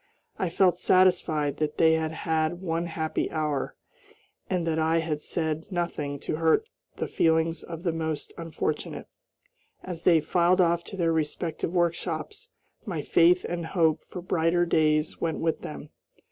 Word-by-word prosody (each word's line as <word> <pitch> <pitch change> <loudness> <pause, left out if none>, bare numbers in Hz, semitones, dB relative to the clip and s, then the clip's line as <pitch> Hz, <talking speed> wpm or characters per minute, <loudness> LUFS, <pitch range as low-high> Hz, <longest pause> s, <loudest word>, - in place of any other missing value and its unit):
I 185 - 0
felt 180 0 +3
satisfied 165 -6 +3
that 150 -1 -2
they 160 -1 +5
had 160 -1 0
had 160 +1 -1
one 170 -2 -2
happy 160 -1 -2
hour, 150 -3 -2 0.7
and 180 -3 0
that 160 -1 0
I 160 +1 +2
had 160 -2 -1
said 160 -1 -2
nothing 155 -5 -2
to 155 - -3
hurt 165 - +2 0.3
the - - -3
feelings 160 0 +1
of 165 0 -8
the 175 - +1
most 160 -2 -3
unfortunate. 165 -2 -3 0.8
As 175 -3 -6
they 170 -2 +5
filed 175 +4 +2
off 170 -1 +3
to 195 - -8
their 165 -2 +2
respective 160 +1 -2
workshops 175 - -2 0.3
my - - -4
faith 360 +2 +4
and 170 -1 -3
hope 160 -2 +1
for 180 - -8
brighter 175 0 +2
days 155 -2 +1
went 165 -2 -1
with 160 -1 -1
them. 150 0 -8
165 Hz, 155 wpm, -27 LUFS, 160-175 Hz, 0.8 s, they